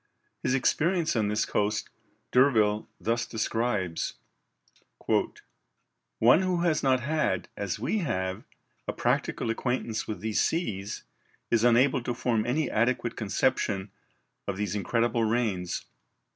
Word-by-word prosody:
His 130 - +1
experience 160 +5 +1
on 110 -2 +2
this 105 +1 +1
coast 105 +1 -1 0.4
D'Urville 110 -5 +3
thus 115 +5 0
describes: 110 -6 -1 2.0
"One 120 +10 +6
who 185 -2 0
has 170 -3 +2
not 130 -2 +3
had, 140 - 0
as 100 -3 -3
we 220 - -1
have, 95 - -2 0.4
a - - -1
practical 115 - 0
acquaintance 120 -1 -2
with 110 - -4
these 110 0 +1
seas, 105 - -2 0.5
is 115 -1 +3
unable 120 +2 +4
to 120 0 -3
form 115 -2 0
any 145 +3 +1
adequate 120 +1 0
conception 100 -1 0 0.6
of 100 -2 -2
these 100 -2 -2
incredible 115 +3 +1
rains. 110 -6 -1
115 Hz, 120 wpm, -28 LUFS, 105-130 Hz, 2.0 s, One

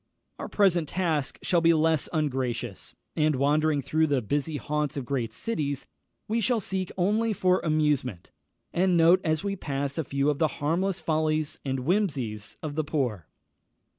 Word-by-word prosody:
Our - - -4
present 175 -6 +2
task 160 -6 -1
shall 175 -2 +2
be 165 0 +5
less 160 -1 +2
ungracious, 125 - -2 0.2
and 155 -1 +2
wandering 145 +2 +2
through 160 +3 +2
the 140 -3 +2
busy 145 +6 -1
haunts 150 -1 -2
of 135 - -3
great 120 -4 -2
cities, 145 - -3 0.4
we 230 +2 0
shall 235 +1 +2
seek 190 -2 -2
only 215 +5 +2
for 185 -1 +2
amusement, 150 - 0 0.4
and 180 0 +3
note 170 +3 +6
as 155 +1 0
we 200 -1 -1
pass 140 -3 -3
a - - +1
few 140 +2 +1
of 145 - -4
the 160 - +4
harmless 175 +6 0
follies 155 -1 0
and 135 -1 -2
whimsies 130 - -1
of 155 -2 -3
the 155 +1 0
poor. 125 - -2
155 Hz, 165 wpm, -27 LUFS, 140-175 Hz, 0.4 s, note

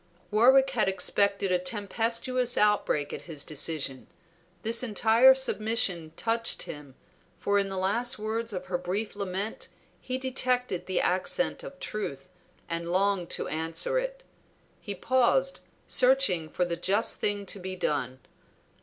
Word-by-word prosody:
Warwick 265 +5 +5
had 220 -6 +2
expected 195 +1 +1
a 180 - +3
tempestuous 230 +6 -1
outbreak 210 -8 +2
at - - -5
his 150 -3 -2
decision; 150 -3 -2 0.6
this 230 +1 +3
entire 235 +2 +5
submission 215 -10 0
touched 230 0 0
him, 145 -3 -9 0.4
for 200 0 +1
in 195 -1 0
the 190 - -4
last 230 +7 0
words 220 +2 -3
of 185 -2 -5
her 180 -1 -2
brief 195 +5 -3
lament 200 +1 -4 0.3
he 255 0 -3
detected 250 -6 -1
the 185 - 0
accent 330 - 0
of - - -10
truth, 145 - -5 0.4
and 170 0 -3
longed 190 -1 +1
to - - -3
answer 165 - -1
it. - - -5 0.6
He 200 -2 -5
paused, 260 - +2 0.3
searching 250 -12 +3
for 180 - 0
the 170 -1 -2
just 200 +6 +1
thing 205 -1 0
to 200 - -7
be 185 0 -5
done. 130 -7 -2
205 Hz, 140 wpm, -28 LUFS, 180-245 Hz, 0.6 s, Warwick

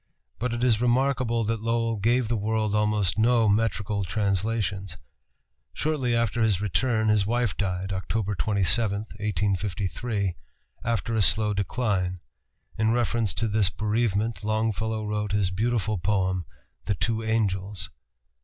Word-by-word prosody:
But 125 0 -1
it 120 +1 -2
is 115 -3 +3
remarkable 125 -1 +2
that 115 0 -1
Lowell 115 0 0
gave 120 +4 +2
the 115 - 0
world 110 0 0
almost 105 -3 +1
no 115 0 +4
metrical 105 -1 +1
translations. 100 -1 -1 0.8
Shortly 135 -6 0
after 115 0 0
his 105 -5 +3
return 110 +4 +1
his 105 -2 +3
wife 120 -2 0
died 95 -1 -2
(Oct. 100 +1 -2
27, 100 +3 +2
1853) 100 0 -2 0.5
after 115 0 -1
a 110 - +2
slow 105 +1 +4
decline. 100 -3 -1 0.6
In 110 0 +3
reference 115 -3 +1
to 115 - 0
this 105 -3 +2
bereavement 110 0 -1
Longfellow 110 0 -1
wrote 105 -1 -2
his 100 -3 +2
beautiful 110 0 0
poem, 95 -2 0 0.4
"The 105 - 0
Two 115 +3 -1
Angels." 105 -3 -1
105 Hz, 130 wpm, -26 LUFS, 100-115 Hz, 0.8 s, no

